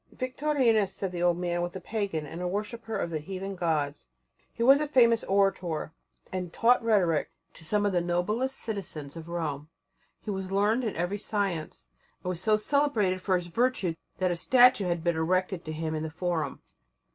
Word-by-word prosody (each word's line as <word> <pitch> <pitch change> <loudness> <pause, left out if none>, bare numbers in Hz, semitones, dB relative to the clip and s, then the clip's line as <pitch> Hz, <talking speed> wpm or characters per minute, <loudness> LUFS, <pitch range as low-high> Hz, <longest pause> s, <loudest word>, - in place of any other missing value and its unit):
Victorinus, 255 -6 +1
said 195 -2 -3
the 175 -1 -4
old 175 -1 +3
man, 175 -1 -1
was 175 +1 -3
a - - -4
pagan 200 -9 -3
and 165 +4 -7
a 180 - -1
worshipper 215 +3 -3
of 170 - -2
the 155 - -1
heathen 190 +4 -5
gods. 155 - -1 0.4
He 230 - -3
was 270 +3 +7
a 300 - -1
famous 235 -5 +4
orator, 185 -5 0 0.4
and 180 -2 -3
taught 240 +4 +3
rhetoric 185 -9 +2 0.2
to - - -13
some 205 +5 +1
of 200 - +1
the 175 - +2
noblest 210 +10 -1
citizens 170 -10 -5
of 165 0 -9
Rome. 155 -4 -3 0.5
He 210 - -5
was 190 -1 -4
learned 210 +5 +2
in 220 - -2
every 175 +5 -2
science, 195 - -3 0.4
and 180 - -2
was 180 -1 -3
so 215 +1 +3
celebrated 215 -7 +1
for 190 0 +1
his 180 -1 -1
virtue 200 -1 +1 0.2
that 185 -1 +1
a - - 0
statue 245 +3 +5
had 170 -2 -1
been 170 -1 +1
erected 180 +2 0
to 155 - -4
him 160 0 -3
in 155 - -2
the 160 - -3
forum. 175 0 -3
185 Hz, 190 wpm, -28 LUFS, 170-215 Hz, 0.5 s, was